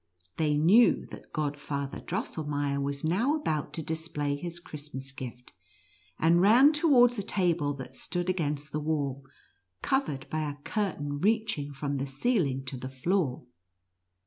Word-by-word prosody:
They 150 -2 +2
knew 185 +11 +5
that - - -11
Godfather 145 -2 -3
Dros - - -3
selmeier 145 -2 -1
was 140 0 -3
now 215 - +2
about 155 - -2
to 160 - -4
display 150 -2 -2
his 170 +3 -6
Christmas 145 -5 -7
gift, 125 -3 -9 0.6
and 170 +2 +4
ran 245 +10 +7
towards 250 -7 +5
a - - +1
table 175 -7 0
that 135 -2 -8
stood 175 -1 -3
against 150 -5 -1
the 150 - -1
wall, 145 -3 -1 0.6
covered 150 - 0
by 155 - 0
a 145 - -6
curtain 145 -9 -2
reaching 210 -7 +1
from 140 0 -3
the 135 +1 -2
ceiling 140 - 0
to 130 0 -4
the 130 +1 -6
floor. 135 0 -1
150 Hz, 145 wpm, -29 LUFS, 140-185 Hz, 0.6 s, ran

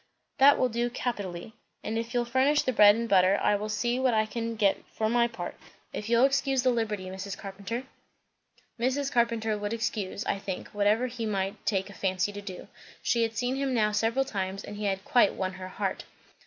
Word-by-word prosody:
"That 280 +2 +7
will 255 - +3
do 240 +1 -1
capitally. 205 -5 -4 0.3
If 225 +2 -3
you'll 240 0 +2
furnish 265 +5 +3
the 255 - 0
bread 205 -2 +7
and 230 +1 -2
butter, 190 -1 +4
I 210 - +3
will 210 +1 -3
see 240 +4 0
what 255 -3 +2
I 215 0 +3
can 230 +1 -4
get 205 -3 +2
for 220 - -2
my 235 0 +3
part. 235 - -6 0.4
If 210 - -5
you'll 235 +2 +5
excuse 270 -1 +1
the 255 - +4
liberty, 215 -5 -2
Mrs. 190 +1 -6
Carpenter?" 200 +5 -5 1.0
Mrs. 270 +3 0
Carpenter 230 -2 +1
would 205 +1 -3
excuse, 220 -2 -3
I 195 - -1
think, 195 -2 -5
whatever 210 +4 +2
he 240 -2 -4
might 195 0 -2
take 195 -3 +1
a - - -11
fancy 190 0 -1
to 205 0 -7
do. 190 -3 -8 0.4
She 235 - +2
had 225 0 -1
seen 250 +2 0
him 270 -2 0
now 210 -2 +2
several 230 +5 +1
times, 195 -5 -3
and 205 - -8
he 210 - -3
had 195 0 -1
quite 240 -5 +4
won 185 -1 -2
her 185 0 -7
heart. 190 0 -3
220 Hz, 205 wpm, -28 LUFS, 200-240 Hz, 1.0 s, That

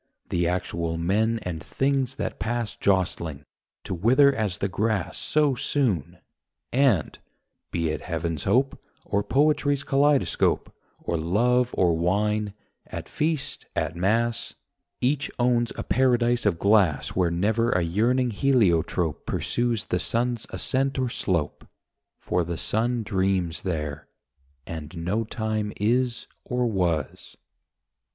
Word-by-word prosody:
The 85 -1 +1
actual 85 -2 -2
men 105 +7 +1
and 85 -3 -4
things 135 - 0
that - - -4
pass 120 -1 -2
Jostling, 85 -6 0 0.4
to - - -4
wither 130 +10 +4
as 105 -8 -2
the 100 - -1
grass 100 -1 -1
So 150 -2 +2
soon: 120 - -1 0.6
and 125 - +2 0.5
(be 85 -1 -1
it 80 - -3
heaven's 85 -2 -3
hope, 135 +3 +1 0.2
Or 100 - 0
poetry's 145 +3 +2
kaleidoscope, 140 0 +2 0.2
Or 85 - -2
love 120 +10 +2
or 85 -3 +3
wine, 105 +4 0 0.3
at - - -7
feast, 155 -1 -2
at - - -1
mass) 115 +6 0 0.5
Each 140 +3 +1
owns 120 -1 +2
a - - -4
paradise 120 -3 +2
of 90 -5 +1
glass 100 -7 +3
Where 90 -2 +1
never 110 +7 +1
a 90 -6 +2
yearning 120 +9 +1
heliotrope 95 - +1
Pursues 120 -3 0
the 90 - -1
sun's 120 +3 -1
ascent 135 +1 0
or 130 -2 0
slope; 85 -9 -2 0.5
For 90 0 0
the 85 0 -4
sun 115 +5 0
dreams 95 -3 0
there, 75 -5 -4 0.6
and 80 0 -7
no 95 +7 -1
time 110 -2 -2
is 120 +3 +1 0.2
or 125 0 -1
was. 90 - -2
105 Hz, 125 wpm, -25 LUFS, 85-125 Hz, 0.6 s, wither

